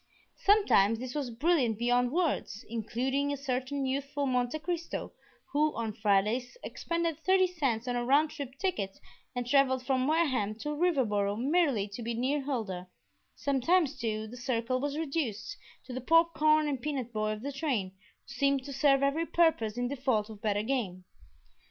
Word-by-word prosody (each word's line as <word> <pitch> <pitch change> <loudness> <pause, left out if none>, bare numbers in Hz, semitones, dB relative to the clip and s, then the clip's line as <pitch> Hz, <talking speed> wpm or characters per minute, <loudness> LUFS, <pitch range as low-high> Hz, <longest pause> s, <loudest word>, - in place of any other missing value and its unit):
Sometimes 310 - +4
this 250 +1 -6
was 285 -4 -2
brilliant 245 -2 +1
beyond 245 +1 +2
words, 310 - -1
including 255 +5 -1
a 285 - -2
certain 270 +1 -2
youthful 280 +2 -2
Monte 250 +1 0
Cristo, 335 +1 -4 0.4
who 300 0 +2
on 225 -2 -3
Fridays 215 - +1
expended 335 -2 -2
thirty 375 +2 +4
cents 270 -10 -1
on 245 - -1
a 240 - 0
round 290 +5 +3
trip 280 -3 -7
ticket 215 - -2 0.4
and 245 0 -2
traveled 260 -1 +3
from 260 0 +1
Wareham 260 -10 +1
to 230 +7 -5
Riverboro 260 - +1
merely 275 - +2
to 200 +4 -7
be 230 0 -3
near 265 +5 0
Huldah; 215 -10 -3 0.5
sometimes, 285 +3 +2
too, 220 -4 -2
the 235 +3 -10
circle 245 0 -1
was 285 +2 -2
reduced 280 - -2 0.3
to 255 - -8
the 255 - -4
popcorn 310 0 +4
and 275 -4 -2
peanut 265 -5 -3
boy 215 0 0
of 215 +2 -8
the 285 - -3
train, 265 -10 -1
who 190 +1 -17
seemed 275 -1 +1
to 280 +1 -7
serve 275 0 +3
every 305 +4 +1
purpose 245 -11 +2
in 245 0 0
default 245 -5 -1
of 210 -2 -11
better 205 -1 0
game. 215 -8 -2
260 Hz, 165 wpm, -30 LUFS, 230-295 Hz, 0.5 s, Sometimes